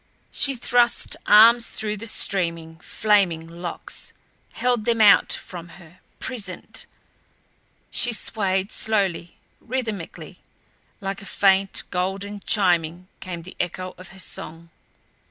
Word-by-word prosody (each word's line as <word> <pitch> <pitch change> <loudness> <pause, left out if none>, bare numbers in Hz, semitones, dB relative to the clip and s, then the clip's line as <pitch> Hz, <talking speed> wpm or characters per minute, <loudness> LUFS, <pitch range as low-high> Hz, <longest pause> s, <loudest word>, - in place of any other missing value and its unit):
She 275 -1 +2
thrust 240 0 +2
arms 230 +2 +7
through 210 -1 -3
the 225 +3 -4
streaming, 170 -6 +1
flaming 190 -7 +1
locks; 170 +1 -6 0.4
held 245 -3 0
them 230 -1 +1
out 210 -2 +6
from 175 -2 -6
her, 175 -1 -17 0.2
prisoned. 210 -8 -6 1.0
She 240 - +2
swayed 195 -3 -1
slowly, 195 -6 -1 0.2
rhythmically; 225 -8 -5 0.6
like 195 0 -4
a - - -11
faint, 195 -1 +2
golden 195 +3 -3
chiming 180 -3 +1
came 175 -3 -7
the 185 - -11
echo 185 +1 -3
of 185 - -10
her 190 - -15
song. 165 -2 -5
195 Hz, 115 wpm, -23 LUFS, 175-220 Hz, 1.0 s, arms